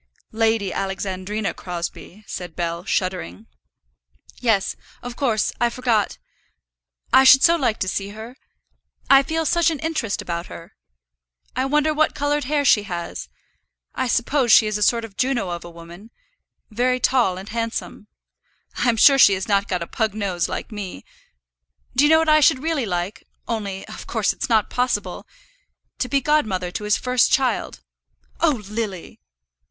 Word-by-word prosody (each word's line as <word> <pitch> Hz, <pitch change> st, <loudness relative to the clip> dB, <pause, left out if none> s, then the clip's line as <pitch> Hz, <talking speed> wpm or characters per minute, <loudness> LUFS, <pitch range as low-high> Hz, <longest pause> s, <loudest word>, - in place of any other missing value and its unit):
"Lady 220 Hz, -3 st, 0 dB
Alexandrina 195 Hz, +2 st, -3 dB
Crosbie," 175 Hz, +3 st, -7 dB
said 175 Hz, -4 st, -7 dB
Bell, 170 Hz, 0 st, -3 dB
shuddering. 180 Hz, -, -3 dB, 0.9 s
"Yes, 225 Hz, -5 st, +1 dB, 0.3 s
of 245 Hz, -1 st, -7 dB
course; 235 Hz, -6 st, 0 dB
I 240 Hz, -, +3 dB
forgot. 235 Hz, -4 st, 0 dB, 1.0 s
I 265 Hz, -, +7 dB
should 270 Hz, 0 st, +7 dB
so 335 Hz, -, +6 dB
like 250 Hz, -9 st, 0 dB
to 190 Hz, -, 0 dB
see 195 Hz, +1 st, -3 dB
her. 220 Hz, +4 st, -10 dB, 0.8 s
I 275 Hz, 0 st, +8 dB
feel 320 Hz, +3 st, -2 dB
such 340 Hz, 0 st, +3 dB
an 320 Hz, -, -3 dB
interest 310 Hz, -9 st, -2 dB
about 170 Hz, 0 st, -4 dB
her. 165 Hz, -, -11 dB, 0.8 s
I 255 Hz, +2 st, 0 dB
wonder 300 Hz, +2 st, +2 dB
what 310 Hz, +1 st, +1 dB
coloured 290 Hz, -1 st, -1 dB
hair 290 Hz, +1 st, 0 dB
she 215 Hz, -, +5 dB
has. 170 Hz, -1 st, -5 dB, 0.6 s
I 260 Hz, -, -2 dB
suppose 245 Hz, +1 st, +1 dB
she 220 Hz, -, +7 dB
is 215 Hz, -1 st, -2 dB
a 210 Hz, -, -2 dB
sort 230 Hz, +2 st, +2 dB
of 200 Hz, -3 st, -15 dB
Juno 250 Hz, -8 st, 0 dB
of 175 Hz, 0 st, -5 dB
a 175 Hz, -, -9 dB
woman, 170 Hz, +5 st, -13 dB, 0.6 s
very 250 Hz, +3 st, +1 dB
tall 240 Hz, -9 st, +2 dB
and 195 Hz, +3 st, -9 dB
handsome. 230 Hz, -2 st, -4 dB, 0.7 s
I'm 240 Hz, -2 st, +1 dB
sure 275 Hz, +4 st, +6 dB
she 200 Hz, -, +7 dB
has 190 Hz, -, -5 dB
not 200 Hz, -1 st, +1 dB
got 180 Hz, -2 st, -2 dB
a -, -, -6 dB
pug 220 Hz, +2 st, -2 dB
nose 190 Hz, -5 st, -2 dB
like -, -, -5 dB
me. 195 Hz, -, -7 dB, 0.9 s
Do 265 Hz, -, +4 dB
you -, -, +4 dB
know 320 Hz, -, +6 dB
what 320 Hz, 0 st, +1 dB
I 310 Hz, 0 st, +6 dB
should 290 Hz, -3 st, +3 dB
really 315 Hz, -7 st, -1 dB
like, 180 Hz, +2 st, -3 dB, 0.2 s
only 200 Hz, -4 st, -4 dB
of -, -, -10 dB
course -, -, 0 dB
it's -, -, -5 dB
not 220 Hz, -3 st, +2 dB
possible; 250 Hz, 0 st, -2 dB, 0.7 s
to 250 Hz, -, -2 dB
be 280 Hz, -1 st, +1 dB
godmother 215 Hz, -11 st, 0 dB
to 210 Hz, -, -5 dB
his 210 Hz, -, +2 dB
first 250 Hz, -1 st, +2 dB
child." 265 Hz, -2 st, 0 dB, 0.6 s
"Oh, 290 Hz, -10 st, +1 dB
Lily!" 210 Hz, -4 st, -5 dB
225 Hz, 165 wpm, -22 LUFS, 195-265 Hz, 1.0 s, I